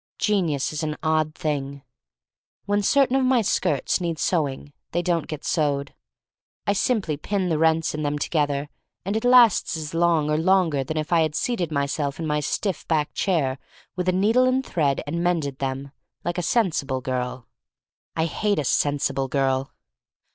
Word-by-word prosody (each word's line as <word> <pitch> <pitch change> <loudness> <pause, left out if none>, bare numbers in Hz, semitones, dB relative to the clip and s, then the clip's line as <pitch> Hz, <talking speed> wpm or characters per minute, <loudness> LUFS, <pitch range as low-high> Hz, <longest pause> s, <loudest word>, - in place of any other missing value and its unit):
Genius 170 -10 0
is 150 - -3
an 155 -1 -3
odd 155 -1 +1
thing. 140 -2 -3 0.8
When 205 0 +1
certain 265 +5 +3
of 270 - +3
my 255 -3 +3
skirts 180 -5 0
need 170 -2 -2
sew 160 -2 +1
ing, 140 +2 -10 0.2
they 175 +1 0
don't 170 -3 0
get 155 -2 -6
sewed. 145 -3 0 0.7
I 200 - +2
simply 195 - 0
pin 190 +3 -1
the 160 -2 0
rents 160 0 +2
in 155 - -3
them 145 0 -1
together 145 -1 -1 0.4
and 200 +3 -1
it 220 - -1
lasts 245 -8 +5
as 155 -1 -6
long 165 -2 +2
or 150 0 +1
longer 165 -4 +2
than 155 +4 -4
if 155 +2 -2
I 165 - +5
had 155 -1 0
seated 185 -10 -1
myself 140 0 -1
in 165 - -3
my 150 -1 0
stiff 180 +5 -2
backed 155 -3 0
chair 145 -9 0 0.4
with 180 0 -1
a - - +4
needle 215 +7 +3
and 255 +1 +1
thread 145 -5 0
and 170 +4 -2
mended 155 -6 -1
them 135 +1 -3 0.2
— - - -53
like 175 +1 -1
a - - 0
sensible 155 - 0
girl. 125 -1 -3 0.7
(I 160 - +1
hate 205 +5 0
a 150 - 0
sensible 140 -1 0
girl.) 135 0 0
155 Hz, 180 wpm, -24 LUFS, 145-185 Hz, 0.8 s, lasts